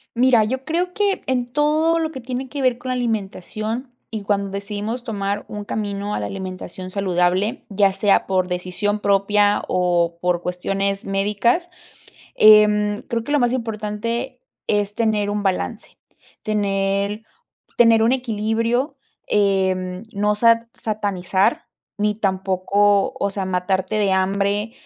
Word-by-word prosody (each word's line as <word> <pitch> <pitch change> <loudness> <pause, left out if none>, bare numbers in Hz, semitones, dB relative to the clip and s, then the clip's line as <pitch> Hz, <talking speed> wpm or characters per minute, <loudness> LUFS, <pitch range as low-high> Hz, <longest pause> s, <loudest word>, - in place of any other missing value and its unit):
Mira, 240 -2 +5
yo 260 +4 -3
creo 355 +3 -1
que 405 -1 0
en 245 -2 -1
todo 310 +3 +2
lo 320 -1 -1
que 260 - -7
tiene 255 +1 -5
que 285 0 -4
ver 250 -2 +2
con 255 +1 -7
la - - +1
alimentación 220 +2 -3 0.2
y 215 -3 -5
cuando 200 -1 0
decidimos 210 +4 -4
tomar 205 -3 -3
un 210 -1 -6
camino 205 -1 -3
a - - -2
la - - -3
alimentación 185 -1 -6
saludable, 185 +3 0
ya 200 -1 +3
sea 200 +1 +2
por 185 -1 +1
decisión 185 +4 -2
propia 205 +1 +2
o 175 -2 +1
por 180 -1 +1
cuestiones 195 +2 -2
médicas, 210 - +1 0.7
eh, 215 0 +8
mm, 210 0 0
creo 230 -2 -1
que 290 - -4
lo 295 - +4
más 245 -1 +2
importante 230 +2 -3 0.3
es 205 -1 0
tener 215 -3 +1
un 205 0 -2
balance, 185 - -3 0.4
tener 200 0 -1 0.6
tener 230 -2 +6
un 235 +3 +4
equilibrio, 230 +3 -1 0.3
eh, 190 -2 +1
no 210 +1 +1
sa 230 +1 +3
satanizar, 200 -3 0 0.3
ni 210 0 +1
tampoco, 195 0 +1
o 200 - 0
sea, 195 -1 -3
matarte 190 +2 -1
de 200 -2 +2
hambre 200 +3 0
210 Hz, 140 wpm, -21 LUFS, 195-230 Hz, 0.7 s, eh